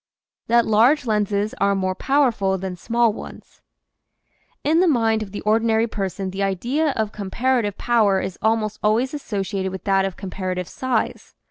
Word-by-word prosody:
THAT 235 0 +4
LARGE 240 +7 +4
LENSES 210 -1 0
ARE 200 0 +3
MORE 185 -1 0
POWERFUL 225 -6 +1
THAN 185 -1 -5
SMALL 230 +4 +1
ONES - - -11 1.0
N 315 +3 +3
the 365 - +4
mind 225 -7 +2
of 205 -3 -6
the 205 - -6
ordinary 225 +1 +2
person 195 -3 -4
the 190 +1 -4
idea 240 - 0
of 215 -2 -1
comparative 210 +2 -1
power 215 -5 +2
is 190 - -5
almost 220 -1 0
always 230 +6 +1
associated 195 -8 -3
with 190 - -7
that 195 -1 +2
of 195 - -5
comparative 185 -2 -4
size. 255 -4 -3
215 Hz, 155 wpm, -22 LUFS, 195-235 Hz, 1.0 s, THAT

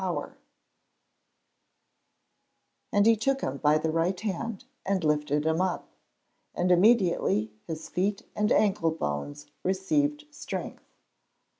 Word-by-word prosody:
[Verse: 180 -2 -2 2.6
"And 205 0 +3
he 230 0 +6
took 270 +5 0
him 130 - -2
by 150 +1 +3
the 155 +1 -1
right 170 +3 0
hand, 215 +1 -4 0.2
and 190 -2 0
lifted 150 -1 +1
him 160 +2 +2
up; 185 -2 -2 0.7
and 180 +1 +1
immediately 180 - +3 0.2
his 160 -1 -5
feet 200 +4 -1
and 210 0 +1
ankle 195 -6 +3
bones 145 - -4 0.2
received 290 +11 0
strength." 295 - -7
180 Hz, 115 wpm, -28 LUFS, 155-210 Hz, 2.6 s, he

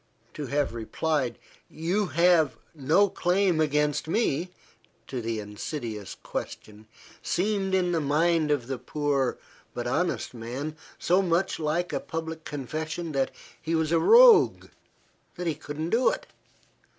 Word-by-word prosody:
To 145 -2 -5
have 145 0 0
replied 125 +2 -1 0.3
"You 180 +6 -1
have 170 -2 +3 0.2
no 160 +7 +3
claim 180 -2 +1
against 150 0 +1
me," 170 -3 0 0.6
to 130 -2 -5
the 115 -1 -2
insidious 105 - -6
question, 105 0 -7 0.3
seemed 195 0 0
in 180 -1 +1
the 165 -2 +1
mind 155 +2 +2
of 145 -5 +1
the 130 0 -4
poor, 145 -4 -1 0.4
but - - -3
honest - - -1
man, 125 +6 -5 0.2
so 180 +3 +2
much 175 0 0
like 165 +3 -1
a - - 0
public 160 0 -6
confession 155 +4 -4
that 135 -2 0 0.3
he 165 +1 -1
was 160 -1 0
a 165 - +4
rogue, 470 - +6 0.7
that 180 - -5
he 165 - +1
could 145 0 -8
not 160 +2 -2
do 245 +3 +4
it. - - -4
155 Hz, 140 wpm, -27 LUFS, 140-175 Hz, 0.7 s, rogue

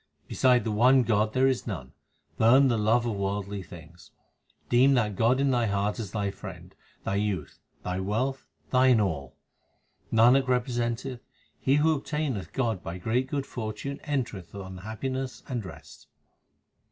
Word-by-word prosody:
Beside 125 -2 +3
the 110 - -2
one 125 +5 +5
God 110 -1 +1
there 130 +1 +3
is 130 -2 +1
none: 70 - -6 0.5
burn 130 +5 +6
the 120 - +1
love 115 +3 +2
of 115 -3 -1
worldly 100 0 -3
things. 85 -1 -13 0.6
Deem 130 +3 +5
that 105 -5 +1
God 115 +6 +3
in 140 -1 +2
thy 120 -2 +2
heart 100 +2 -1
as 105 -4 -4
thy 100 -1 -2
friend, 95 - -10 0.3
thy - - -2
youth, 105 -2 -2 0.2
thy 90 +1 -2
wealth, 125 +8 -2 0.2
thine 130 -2 +5
all. 80 -10 -2 0.8
Nanak 125 +4 +5
representeth, 125 0 -1 0.4
he 135 - +2
who 155 +2 +4
obtaineth 145 - -3
God 115 -8 -1
by 85 +1 -6
great 120 +8 0
good 140 0 -2
fortune 120 +4 -5
enter 135 -9 -2
eth 85 +2 -15
on 95 -2 -7
happiness 130 +6 -4
and 120 -4 -3
rest. 95 - -12
115 Hz, 155 wpm, -27 LUFS, 100-130 Hz, 0.8 s, burn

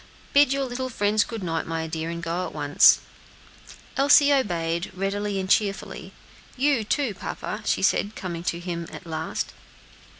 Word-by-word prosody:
Bid 285 -1 +6
your 275 0 +1
little 255 0 -3
friends 210 -2 +2
good 225 -4 -6
night, 165 -2 -2
my 165 0 -2
dear, 160 0 -4
and 170 0 -5
go 170 +2 -2
at - - -11
once." - - +5 0.9
Elsie 285 +1 +6
obeyed, 170 -9 0
readily 200 +1 -2
and 190 - -3
cheerfully. 200 0 0 0.5
"You, 270 -3 +2
too, 240 +2 0
papa," - - -5
she - - +1
said, 205 +2 +2
coming 170 -3 -5
to 170 - -1
him 170 -1 -5 0.2
last. 160 -1 -4
195 Hz, 155 wpm, -25 LUFS, 170-245 Hz, 0.9 s, Bid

